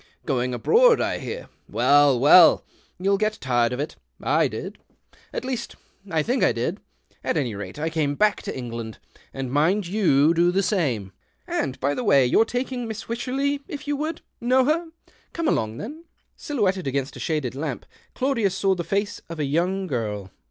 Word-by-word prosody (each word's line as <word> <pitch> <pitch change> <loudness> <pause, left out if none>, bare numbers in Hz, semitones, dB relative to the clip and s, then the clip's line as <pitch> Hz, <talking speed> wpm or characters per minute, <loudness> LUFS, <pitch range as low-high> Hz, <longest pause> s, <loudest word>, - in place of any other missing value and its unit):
Going 125 -3 0
abroad, 465 - +4
I - - -1
hear. - - -6 0.2
Well, 145 -3 +4
well 155 +5 +7 0.2
— - - -36
you'll 195 +1 +2
get 215 0 0
tired 120 -2 +1
of 125 - -3
it. 150 - -4 0.2
I - - +2
did - - -7 0.3
— - - -29
at - - -4
least, 255 -3 -4 0.3
I 160 -3 +1
tliink 250 - 0
I - - +5
did. - - -2 0.4
At - - 0
any 130 -7 -1
rate, 100 +1 -7
I 160 +2 -2
came 150 -3 0
back 210 +5 +2
to - - -5
England 115 -3 -6 0.2
— - - -27
and 135 -2 -5
mind 170 +8 +2
you 170 -6 +3
do 170 +1 +3
the 195 +2 +1
same. 130 - 0 0.3
And, 130 -2 -2
by 140 +2 +1
the 250 - -3
way, 140 - +5
you're 175 - +4
taking 250 +1 -3
in 235 - -4
Miss 220 -1 -6
Wycherley, 270 +4 -1
if 290 0 -7
you 290 - 0
would. 310 +3 -3 0.2
Know 255 +2 +3
her 330 +4 +1 0.2
'\ - - -34
Come 335 -1 -1
along, 110 - 0
then." 305 - -8 0.3
Silhouetted 195 - -1
against 135 +1 -2
a - - -9
shaded 150 -7 -2
lamp, 140 -1 -4 0.3
Claudius 230 -8 +1
saw 195 -1 +2
the 175 -2 -3
foce 200 +3 -2
of 165 -1 -7
a 150 - 0
young 180 +7 0
girl. 105 - -3
175 Hz, 195 wpm, -24 LUFS, -, 0.4 s, well